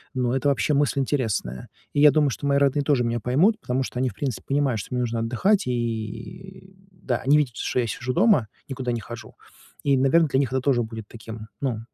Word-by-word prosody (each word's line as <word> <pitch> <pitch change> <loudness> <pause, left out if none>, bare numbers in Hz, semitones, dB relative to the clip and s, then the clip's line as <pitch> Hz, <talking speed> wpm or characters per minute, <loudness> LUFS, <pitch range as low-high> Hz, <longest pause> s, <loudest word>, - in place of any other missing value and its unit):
но 125 -1 0
это 140 +2 +1
вообще 140 +2 +1
мысль 140 -1 +1
интересная. 110 - -2 0.3
И 145 - 0
я 150 0 +8
думаю, 150 0 +3
что 140 - -4
мои 140 0 +3
родные 140 +1 +2
тоже 140 -3 +2
меня 120 0 -1
поймут, 160 - +2
потому 130 - -1
что 125 - -5
они, 130 - +1
в - - -11
принципе 130 0 -3
понимают, 140 -5 +1
что - - -7
мне 125 - 0
нужно 115 -1 -1
отдыхать, 130 - +1
и 125 - -5 0.2
да, 145 -9 -3
они 145 +5 +3
видят, 130 -6 0
что - - -1
я 120 - 0
сижу 120 +4 -3
дома, 180 - +4 0.2
никуда 130 -2 -3
не 120 -1 -2
хожу. 120 +2 -10 0.5
И, 140 -1 +3
наверное, 145 +5 +3
для 130 - +2
них 135 -3 +1
это 130 - +1
тоже 130 -2 +2
будет 110 -1 -8
таким, 110 -1 -9
ну, 125 -6 -1
130 Hz, 220 wpm, -24 LUFS, 120-145 Hz, 0.5 s, я